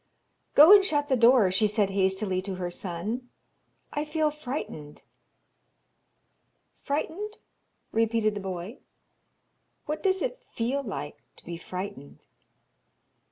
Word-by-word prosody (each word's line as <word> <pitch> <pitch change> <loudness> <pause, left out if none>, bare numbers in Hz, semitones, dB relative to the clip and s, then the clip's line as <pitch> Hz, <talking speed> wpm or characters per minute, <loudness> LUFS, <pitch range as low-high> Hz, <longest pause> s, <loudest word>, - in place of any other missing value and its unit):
'Go 310 +7 +10
and 405 -1 +8
shut 290 -5 0
the 265 - +4
door,' 235 -5 +5
she 200 +3 +3
said 205 -1 +1
hastily 190 0 +1
to 190 0 -5
her 180 -1 -4
son, 205 +9 -4 0.6
'I 295 +1 -1
feel 305 0 0
frightened.' 250 - -6 1.8
'Frightened?' 340 +9 -3 0.5
repeated 225 -1 +1
the 205 - -4
boy. 190 +4 -6 1.1
'What 305 +1 -3
does 380 -1 +1
it - - -3
feel 250 +5 0
like 200 - -6
to - - -16
be 170 - -5
frightened?' 175 -5 -8
225 Hz, 115 wpm, -27 LUFS, 190-295 Hz, 1.8 s, Go